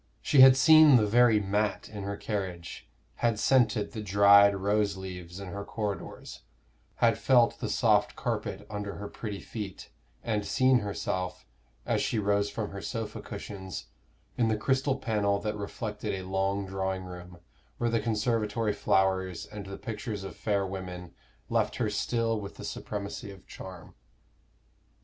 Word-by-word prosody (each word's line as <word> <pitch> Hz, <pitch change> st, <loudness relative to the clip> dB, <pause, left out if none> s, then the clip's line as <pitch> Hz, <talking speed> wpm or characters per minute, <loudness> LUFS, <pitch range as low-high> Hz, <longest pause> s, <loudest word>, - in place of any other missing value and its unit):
She 135 Hz, -, +4 dB
had 130 Hz, 0 st, +9 dB
seen 155 Hz, +1 st, +8 dB
the 110 Hz, -3 st, +5 dB
very 115 Hz, 0 st, +5 dB
mat 105 Hz, 0 st, -1 dB
in 105 Hz, -2 st, -8 dB
her 100 Hz, +1 st, -4 dB
carriage, 95 Hz, -5 st, -5 dB, 0.3 s
had 115 Hz, -2 st, +1 dB
scented 110 Hz, -3 st, +2 dB
the 110 Hz, -, -5 dB
dried 100 Hz, 0 st, +6 dB
rose 100 Hz, +1 st, 0 dB
leaves 90 Hz, -1 st, -8 dB
in 100 Hz, -2 st, -7 dB
her 100 Hz, +2 st, -5 dB
corridors, 105 Hz, -1 st, -5 dB, 0.5 s
had 115 Hz, -2 st, +2 dB
felt 125 Hz, -3 st, +4 dB
the -, -, -3 dB
soft -, -, +2 dB
carpet -, -, -3 dB
under 105 Hz, -1 st, -5 dB
her 100 Hz, -, -6 dB
pretty 100 Hz, -1 st, -6 dB
feet, 105 Hz, -4 st, -7 dB, 0.3 s
and 105 Hz, -3 st, -1 dB
seen 130 Hz, +2 st, +3 dB
herself, 95 Hz, -3 st, -3 dB, 0.4 s
as -, -, +1 dB
she -, -, -1 dB
rose 100 Hz, -1 st, +1 dB
from 105 Hz, +1 st, -4 dB
her 100 Hz, 0 st, -7 dB
sofa 115 Hz, -1 st, -5 dB
cushions, 95 Hz, -5 st, -7 dB, 0.5 s
in 115 Hz, -, +3 dB
the 110 Hz, -1 st, +1 dB
crystal 130 Hz, +4 st, +1 dB
panel 105 Hz, -5 st, 0 dB
that 105 Hz, +1 st, -3 dB
reflected 105 Hz, 0 st, -4 dB
a 95 Hz, -1 st, -6 dB
long 95 Hz, +1 st, 0 dB
drawing 95 Hz, 0 st, -3 dB
room, 90 Hz, -1 st, -10 dB, 0.4 s
where 120 Hz, -1 st, 0 dB
the 115 Hz, -, +2 dB
conservatory 110 Hz, -1 st, 0 dB
flowers 95 Hz, -3 st, +1 dB
and 105 Hz, -2 st, -9 dB
the 100 Hz, 0 st, -7 dB
pictures 105 Hz, -3 st, -5 dB
of 95 Hz, -, -7 dB
fair 100 Hz, -3 st, 0 dB
women 90 Hz, -2 st, -7 dB, 0.3 s
left -, -, 0 dB
her -, -, -1 dB
still 115 Hz, -2 st, 0 dB
with 100 Hz, 0 st, -8 dB
the -, -, -8 dB
supremacy 105 Hz, +1 st, -5 dB
of 95 Hz, -1 st, -12 dB
charm. 95 Hz, -3 st, -10 dB
100 Hz, 155 wpm, -29 LUFS, 95-115 Hz, 0.5 s, had